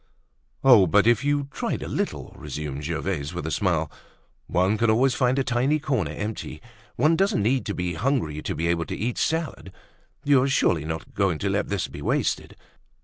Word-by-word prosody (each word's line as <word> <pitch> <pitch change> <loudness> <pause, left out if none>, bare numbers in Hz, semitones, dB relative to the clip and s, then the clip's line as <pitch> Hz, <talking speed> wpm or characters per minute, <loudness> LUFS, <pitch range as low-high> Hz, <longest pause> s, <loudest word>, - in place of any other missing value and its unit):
"Oh! 120 -8 +7
but 105 +5 +4
if 120 +2 +3
you 145 -1 0
tried - - -3
a - - -5
little," - - -3
resumed 75 -1 -6
Gervaise 80 -1 -3
with 90 - -4
a 80 - -3
smile. 85 -6 0 0.6
"One 90 +4 +2
can 115 - +3
always 125 +4 +3
find 125 0 +1
a 135 - +2
tiny 130 +4 +1
corner 130 - -1
empty. 105 +8 -5 0.4
Once 155 +5 +3
doesn't 195 - +2
need 125 +4 +1
to 100 - -2
be 90 -1 -2
hungry 85 - -1
to - - -3
be 85 - -2
able 85 0 +1
to - - -5
eat 115 +4 -2
salad. 160 - -2 0.5
You're 140 -2 +4
surely 85 - +2
not 80 +1 -5
going 95 -5 +1
to 100 +4 -1
let 100 +1 -1
this 100 -3 -1
be - - -9
wasted?" - - -1
105 Hz, 190 wpm, -25 LUFS, 85-130 Hz, 0.6 s, Oh